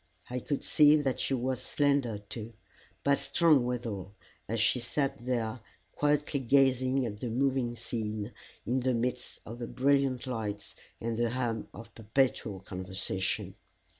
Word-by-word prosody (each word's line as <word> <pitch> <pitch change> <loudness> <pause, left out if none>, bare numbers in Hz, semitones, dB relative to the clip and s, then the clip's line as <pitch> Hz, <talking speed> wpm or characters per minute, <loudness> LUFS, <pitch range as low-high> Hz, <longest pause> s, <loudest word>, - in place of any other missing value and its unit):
I 125 - -1
could 145 +2 -2
see 150 0 +6
that 140 -4 0
she 135 - +1
was 130 0 -1
slender 140 -5 +1
too, 105 +3 -7 0.5
but 140 0 +3
strong 155 -7 +4
withal, 110 -6 -4 0.3
as 115 +2 -1
she 115 +3 +3
sat 135 +2 -2
there 120 -1 -1 0.3
quietly 150 -1 +1
gazing 130 0 +3
at 105 -3 -5
the 120 - -3
moving 130 0 +1
scene 110 -2 -3 0.3
in 125 +2 +1
the 130 0 +1
midst 125 +1 -2
of 115 +2 -8
the 120 - -4
brilliant 135 -1 +2
lights 105 -5 -4 0.3
and 115 0 -2
the 120 -1 +2
hum 120 -2 -2
of 115 +1 -11
perpetual 110 -3 0
conversation. 95 0 -2
120 Hz, 145 wpm, -30 LUFS, 110-135 Hz, 0.5 s, see